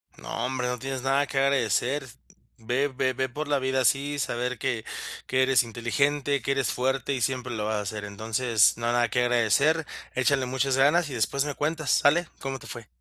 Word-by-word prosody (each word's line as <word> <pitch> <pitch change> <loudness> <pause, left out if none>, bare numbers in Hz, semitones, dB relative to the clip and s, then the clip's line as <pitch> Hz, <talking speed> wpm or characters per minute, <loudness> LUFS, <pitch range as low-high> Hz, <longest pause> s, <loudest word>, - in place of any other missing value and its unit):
No, - - -4
hombre, 125 -1 -2
no 125 0 -2
tienes 135 0 -4
nada 135 +2 +2
que 135 - -5
agradecer. 135 0 +1 0.5
Ve 125 +5 0
ve 130 -1 -1
ve 130 +1 -1
por 150 +5 -5
la 145 -1 +1
vida 130 0 0
así, 140 +4 +1
saber 125 -1 -2
que 125 -4 -2 0.4
que 130 0 +2
eres 130 -1 +4
inteligente, 140 +5 0
que - - -1
eres 135 -4 0
fuerte 130 +1 -1
y 130 - -3
siempre 125 0 -1
lo 105 -2 -2
vas 110 0 -1
a 105 - -3
ser. 105 +1 -5
Entonces, 110 +2 +1
nada 120 0 +1
que 125 - 0
agradecer, 125 +7 +2 0.3
échale 130 +1 +2
muchas 130 +1 0
ganas 155 +5 +4
y - - -6
después 135 +4 0
me 145 - -3
cuentas 155 -1 -1
¿sale?, 165 +4 +3
como 135 0 -4
te - - -14
fue. 115 -3 -9
130 Hz, 200 wpm, -26 LUFS, 120-140 Hz, 0.5 s, eres